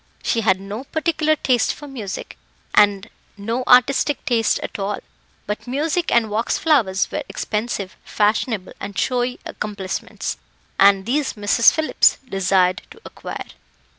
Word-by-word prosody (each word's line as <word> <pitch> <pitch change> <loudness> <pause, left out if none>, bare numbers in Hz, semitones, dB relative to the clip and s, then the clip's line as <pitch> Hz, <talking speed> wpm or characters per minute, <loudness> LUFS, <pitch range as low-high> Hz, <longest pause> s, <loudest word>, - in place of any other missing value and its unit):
She 230 - +1
had 190 -4 +2
no 205 +6 -7
particular 315 0 +1
taste 255 -5 +1
for 295 - -10
music, 225 -8 -6 0.4
and 205 -2 +4 0.3
no 230 +5 -2
artistic 265 +3 +4
taste 230 -3 +2
at - - -6
all; 200 +1 -2 0.5
but 210 +4 -5
music 305 +6 -1
and 225 -3 +2
wax 220 +3 0
flowers 225 -12 +2
were 300 - -2
expensive, 210 -3 -3
fashionable, 210 -1 0
and 200 -1 -7
showy 250 -1 0
accomplishments, 200 -3 -5 0.4
and 195 -1 +5
these 275 +4 0
Mrs. 210 +2 +4
Phillips 315 -1 +3
desired 185 -3 +2
to - - -14
acquire. - - -7
225 Hz, 135 wpm, -21 LUFS, 200-265 Hz, 0.5 s, and